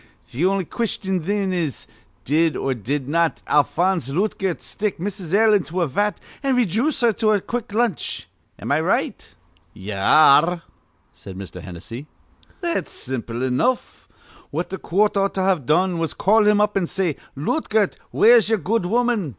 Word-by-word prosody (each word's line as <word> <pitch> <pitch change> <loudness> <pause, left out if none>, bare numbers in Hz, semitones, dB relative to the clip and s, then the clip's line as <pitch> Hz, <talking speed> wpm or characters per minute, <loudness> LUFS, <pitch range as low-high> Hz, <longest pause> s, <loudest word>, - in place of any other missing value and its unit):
Th' 145 +9 -2
on'y 195 -1 +1
question, 190 -3 -2
thin, 195 +2 -1
is 165 -7 -3 0.4
Did 160 +3 +2
or 135 - -1
did 130 +4 -3
not 165 +2 0
Alphonse 170 +1 +1
Lootgert 190 +2 -1
stick 210 -1 -3
Mrs. 185 -2 -5
L. 215 +2 +4
into 185 -3 0
a 170 - +1
vat, 205 +10 -1 0.2
an' 270 -2 +1
rayjooce 245 - +1
her 235 - +5
to 215 +1 +2
a 205 - +2
quick 240 +3 -5
lunch? 220 -4 -1 0.3
Am - - -5
I - - +3
right?" - - -2 0.4
"Ye 100 +3 -7
ar 140 +9 +6
re," 175 -1 -5 0.5
said 95 -1 -11
Mr. 95 -1 -8
Hennessy. 115 - -9 0.5
"That's 340 -2 -2
simple 120 -1 -5
enough. 130 - -1 0.4
What - - -4
th' 190 - -5
coort 205 +5 +1
ought 195 0 0
to've 185 -8 0
done 175 +2 +2
was 165 -1 -2
to - - -28
call 210 +2 +4
him 210 0 +4
up, 210 0 +1
an' 190 -3 +1
say: 180 -6 -1 0.2
'Lootgert, 215 - 0
where's 230 -2 +5
ye'er 225 - +3
good 200 0 -1
woman?' 235 -5 +1
190 Hz, 165 wpm, -21 LUFS, 150-210 Hz, 0.5 s, ar